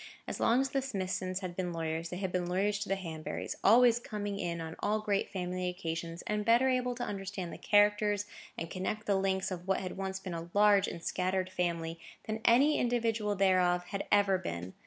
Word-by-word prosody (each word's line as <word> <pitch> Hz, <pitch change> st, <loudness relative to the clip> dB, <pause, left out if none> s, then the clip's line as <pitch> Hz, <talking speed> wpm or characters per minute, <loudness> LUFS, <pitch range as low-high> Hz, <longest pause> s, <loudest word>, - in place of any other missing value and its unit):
As -, -, -4 dB
long 240 Hz, +3 st, +4 dB
as 270 Hz, -, -2 dB
the 270 Hz, -, +1 dB
Smithsons 190 Hz, -6 st, -3 dB
had 180 Hz, -2 st, -5 dB
been 180 Hz, -1 st, -2 dB
lawyers, 165 Hz, 0 st, -3 dB
they 180 Hz, -, -5 dB
had 190 Hz, -1 st, -2 dB
been 180 Hz, -1 st, -1 dB
lawyers 195 Hz, +3 st, +1 dB
to 205 Hz, -, -4 dB
the 195 Hz, -, +2 dB
Hanburys; 165 Hz, -5 st, -5 dB
always 240 Hz, +2 st, +6 dB
coming 205 Hz, -3 st, -4 dB
in 170 Hz, -1 st, -2 dB
on 160 Hz, 0 st, -6 dB
all 210 Hz, +1 st, +1 dB
great 205 Hz, -2 st, 0 dB
family 180 Hz, -1 st, -2 dB
occasions, 170 Hz, -1 st, -5 dB
and 210 Hz, 0 st, -1 dB
better 235 Hz, +4 st, +4 dB
able 250 Hz, -1 st, 0 dB
to 245 Hz, -, -4 dB
understand 195 Hz, -3 st, -4 dB
the -, -, -9 dB
characters, 205 Hz, 0 st, +3 dB, 0.3 s
and 165 Hz, -, -5 dB
connect 210 Hz, +3 st, -3 dB
the 205 Hz, -, +2 dB
links 190 Hz, 0 st, 0 dB
of 180 Hz, 0 st, -6 dB
what 190 Hz, -, +2 dB
had 185 Hz, 0 st, -5 dB
once 190 Hz, 0 st, -3 dB
been 190 Hz, -2 st, -6 dB
a 165 Hz, 0 st, -6 dB
large 205 Hz, -1 st, +5 dB
and 170 Hz, -, -6 dB
scattered 185 Hz, +1 st, -1 dB
family, 170 Hz, -2 st, -2 dB, 0.3 s
than 220 Hz, 0 st, -3 dB
any 275 Hz, +6 st, +5 dB
individual 230 Hz, -4 st, 0 dB
thereof 185 Hz, -2 st, +3 dB
had 200 Hz, -1 st, -4 dB
ever 200 Hz, -2 st, +4 dB
been. 90 Hz, -, -5 dB
190 Hz, 205 wpm, -32 LUFS, 180-210 Hz, 0.3 s, always